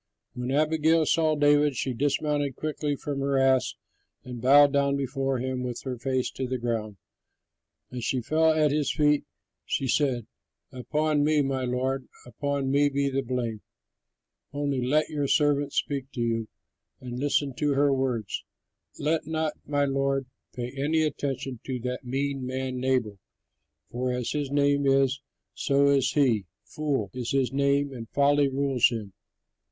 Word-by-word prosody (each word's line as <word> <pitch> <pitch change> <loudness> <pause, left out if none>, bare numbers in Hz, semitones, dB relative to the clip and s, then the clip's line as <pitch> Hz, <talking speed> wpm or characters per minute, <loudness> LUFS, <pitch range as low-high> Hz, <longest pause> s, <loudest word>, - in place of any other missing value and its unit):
When 125 0 -4
Abigail 155 +3 +3
saw 155 0 +2
David, 145 -1 +3
she 130 +2 -2
dismounted 145 +1 0
quickly 150 -1 -2
from 140 0 -4
her 140 0 0
ass 135 -1 +3 0.5
and 125 -2 -8
bowed 140 +3 +6
down 140 0 +2
before 135 0 -1
him 130 +1 -3
with 125 -1 -4
her 130 -2 -3
face 130 0 -1
to 130 - -4
the 130 +1 -2
ground. 115 -4 -3 0.9
As 125 -2 -5
she 130 - 0
fell 160 +6 +2
at 155 -2 +3
his 150 0 +1
feet 150 -1 +2 0.4
she 135 - -2
said, 125 -3 +1 0.5
"Upon 150 +4 0
me, 150 -1 +3
my 135 -1 -1
lord, 130 +1 -1 0.2
upon 135 +3 -2
me 145 +1 +4
be 140 0 0
the 135 +1 0
blame. 120 -4 -3 0.9
Only 140 -2 -1
let 150 +5 +2
your 145 -2 -1
servant 145 -1 +2
speak 140 -1 -2
to 120 - -3
you, 115 -1 -1 0.5
and 125 -1 -6
listen 145 0 0
to 145 -2 +1
her 140 0 +3
words. 125 -6 -2 0.5
Let 155 0 -1
not 160 -1 -1
my 145 -1 +1
lord 135 0 0 0.3
pay 125 0 -4
any 155 +4 +1
attention 135 -4 -3
to 130 -2 -3
that 125 +1 -4
mean 135 +1 -2
man 130 0 -3
Nabal, 125 -6 0 0.7
for 125 +1 -1
as 125 -1 -2
his 145 -2 -2
name 140 0 +2
is, 135 0 +3 0.3
so 140 0 +2
is 135 -2 +2
he. 120 -10 +2 0.2
'Fool' 135 -5 -2
is 125 -1 -3
his 135 -2 +1
name 140 0 +1
and 115 -3 -8
folly 145 0 +3
rules 135 -2 +2
him. 110 -5 -6
135 Hz, 155 wpm, -27 LUFS, 125-145 Hz, 0.9 s, bowed